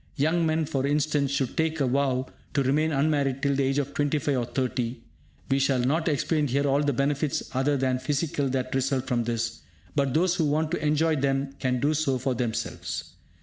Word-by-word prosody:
Young 160 +3 +2
men, 160 0 +1
for 135 -1 -1
instance, 145 -1 +1
should 140 -2 -1
take 160 0 0
a 140 - +2
vow 130 0 +1 0.3
to 140 - +3
remain 150 +4 +2
unmarried 140 -2 +1
till 140 -1 +2
the 140 - +1
age 135 +1 +1
of 140 -1 -1
25 145 0 0
or 125 -2 0
30. 125 -1 -2 0.5
We 135 - +3
shall 135 -1 +2
not 155 +6 +1
explain 150 0 +1
here 140 +3 +1
all 140 +1 +3
the 145 -1 +1
benefits 140 +2 0
other 135 +3 +1
than 130 -1 0
physical 140 +1 -1
that 130 -1 -2
result 135 0 0
from 120 -3 0
this; 115 0 -2 0.4
but 140 -3 +1
those 175 +2 +3
who 165 -3 +1
want 155 +2 0
to 175 - -2
enjoy 155 +1 +2
them 135 0 0
can 125 -1 0
do 145 +4 +2
so 145 -4 +1
for 130 +1 -1
themselves. 120 -2 -3
140 Hz, 200 wpm, -26 LUFS, 130-150 Hz, 0.5 s, to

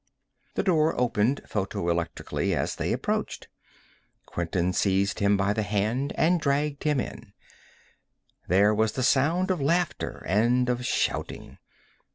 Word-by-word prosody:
The - - 0
door 160 -7 +2
opened 125 +2 +1
photoelectrically 85 -4 -2
as - - -2
they - - -1
approached. - - -2 0.8
Quinton 85 +1 -2
seized 100 +1 +1
him 100 0 +3
by 100 +1 +1
the 110 - -1
hand 110 +6 -1
and 170 +1 +3
dragged 140 0 -1
him 150 -3 +2
in. - - -7 1.1
There 100 +4 +4
was 110 0 +1
the 130 - -2
sound 160 +9 +2
of 180 -5 -1
laughter 170 +5 -1
and 120 +7 +2
of 125 0 -1
shouting. - - -2
120 Hz, 130 wpm, -26 LUFS, 100-145 Hz, 1.1 s, There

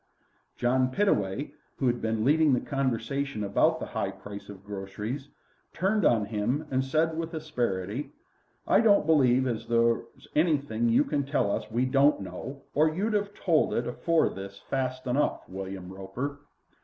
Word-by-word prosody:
John 130 +1 +2
Pittaway, 130 - 0 0.3
who 135 - -1
had 120 -1 +1
been 110 -1 0
leading 150 0 +4
the 125 - +3
conversation 135 -2 -2
about 100 0 +2
the - - -4
high 95 - -2
price 100 +1 -9
of 100 -1 -11
groceries, 105 +7 -5 0.4
turned 195 +1 +1
on 110 -3 +4
him 115 +8 -1
and 130 0 +2
said 160 +4 +1
with 165 +1 -4
asperity: 120 -6 -2 0.6
"I - - +5
don't 205 -6 +5
believe 130 -5 +4
as 120 -4 -3
there's 115 0 0
anything 140 -8 +2
you 115 - +5
can 145 -2 -1
tell 140 -7 0
us - - -1
as - - -19
we 120 +3 +1
don't 140 +3 +4
know, 125 +9 -7
or 155 +2 +4
you'd 205 +7 -1
'ave 205 -1 +1
told 165 -4 +2
it 120 - 0
afore 165 +7 +1
this 100 +1 -8
fast 130 +2 -3
enough, 130 +4 0
William 95 -1 -7
Roper." 120 +10 -5
130 Hz, 165 wpm, -28 LUFS, 105-150 Hz, 0.6 s, I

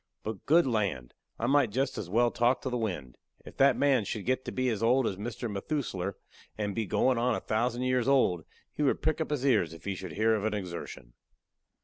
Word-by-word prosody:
But 110 -2 -6
good 165 +4 +5
land! 100 - -1 0.2
I 115 - -2
might 135 -1 +3
jest 130 +5 -1
as 90 - -5
well 120 +4 +3
talk 120 +2 +1
to 130 - -2
the - - -1
wind! 95 - -4 0.3
If - - -12
that 135 -2 +5
man 135 -5 +3
should 100 0 -5
get 130 +1 0
to - - -4
be 130 0 -1
as 110 -4 -2
old 125 +3 +3
as 100 - -1
Mr. 115 +4 -5
Methusler, 100 - -3 0.4
and 105 -1 -2
be 110 -1 -2
goin' 125 +5 +2
on 120 0 +2
a - - -2
thousand 120 +3 -1
years 130 -1 +1
old, 125 - +3 0.3
he - - -4
would 140 - +1
prick 155 0 +1
up - - -2
his 145 -3 -1
ears 100 - +2
if 80 - -15
he 100 - -1
should 95 -3 -7
hear 110 +4 +2
of 105 -2 -1
a 110 -1 0
exertion. 85 -10 -7
115 Hz, 230 wpm, -29 LUFS, 100-130 Hz, 0.4 s, good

